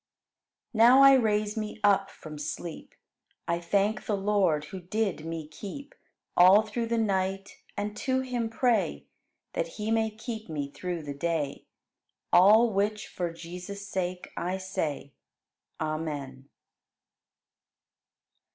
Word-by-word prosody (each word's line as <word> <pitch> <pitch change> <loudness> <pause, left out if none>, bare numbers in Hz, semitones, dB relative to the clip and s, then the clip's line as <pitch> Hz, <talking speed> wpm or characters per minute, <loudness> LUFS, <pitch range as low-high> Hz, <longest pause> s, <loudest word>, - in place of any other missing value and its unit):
3. 225 - -5
Now 250 +4 +8
I 275 0 +9
raise 210 -4 +2
me 215 -1 -4
up 195 -1 +4
from 155 -5 -10
sleep, 150 +3 -6 0.5
I 170 0 0
thank 200 +5 0
the 210 - +1
Lord 195 -7 +1
who 190 - -4
did 195 -2 -2
me 165 -2 -5
keep, 210 - -9 0.4
All 185 +4 +7
through 230 +2 -3
the 230 0 0
night; 195 -2 -1 0.2
and 205 +1 -3
to 260 -1 0
Him 245 -3 -2
pray 235 0 +1 0.5
That - - -1
He 215 +1 -2
may 225 -1 +2
keep 220 -1 -7
me 145 -3 -4
through 175 0 -4
the 145 -1 -5
day. 150 -1 -2 0.7
All 215 +5 +7
which 210 +2 -1
for 175 -2 -3
Jesus' 180 +4 -8
sake, 180 -2 -3
I 180 +2 -2
say. 160 -7 -4 0.7
Amen. 145 -4 -4
195 Hz, 130 wpm, -28 LUFS, 170-220 Hz, 0.7 s, I